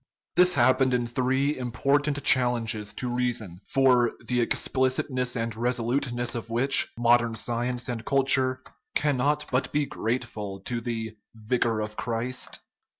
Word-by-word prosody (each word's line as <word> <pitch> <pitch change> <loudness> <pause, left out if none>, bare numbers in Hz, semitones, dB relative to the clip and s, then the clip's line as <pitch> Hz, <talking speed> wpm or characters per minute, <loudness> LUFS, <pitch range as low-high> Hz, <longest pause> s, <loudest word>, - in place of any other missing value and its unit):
This 180 0 +5
happened 130 +1 +3
in 120 -1 0
three 130 +4 0
important 140 +4 0
challenges 115 -4 +2
to 125 - -4
reason, 120 -7 -2
for 125 -3 +3
the 125 -1 +1
explicitness 130 +1 0
and 115 -1 -2
resolute 125 +3 0
ness 120 0 -2
of 115 -1 -5
which 130 +4 +3
modern 120 -1 +3
science 120 +2 -2
and 120 -2 -4
culture 130 -1 +2 0.4
cannot 150 +1 +1
but 130 +1 0
be 150 0 +1
grateful 110 -6 -4
to 120 +3 -3
the 115 -2 -4
" - - -36
Vicar 115 0 0
of 105 0 -6
Christ." 120 +2 -3
125 Hz, 140 wpm, -26 LUFS, 115-130 Hz, 0.4 s, This